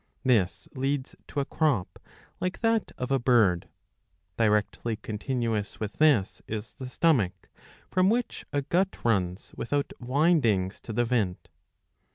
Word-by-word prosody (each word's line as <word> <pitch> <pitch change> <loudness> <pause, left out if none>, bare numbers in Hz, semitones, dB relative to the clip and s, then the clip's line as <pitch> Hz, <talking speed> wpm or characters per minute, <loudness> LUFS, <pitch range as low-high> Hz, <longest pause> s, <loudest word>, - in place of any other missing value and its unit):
This 110 -8 +2
leads 135 0 -2
to 145 - -2
a - - -2
crop, 145 - 0 0.4
like 185 +1 -3
that 225 -1 +1
of 125 +1 -3
a 135 - +3
bird. 115 -9 +3 0.7
Directly 110 +1 +1
continuous 110 -1 -3
with 105 -1 -4
this 140 -11 +3
is 110 0 -5
the 130 -3 -7
stomach, 130 - +1 0.4
from 185 +1 +4
which 240 +2 -1
a 145 -1 0
gut 185 +7 +1
runs 95 -4 0
without 145 +3 -1
windings 125 - +2
to - - -7
the 120 +2 +2
vent. 110 -7 -1
120 Hz, 135 wpm, -28 LUFS, 105-145 Hz, 0.7 s, from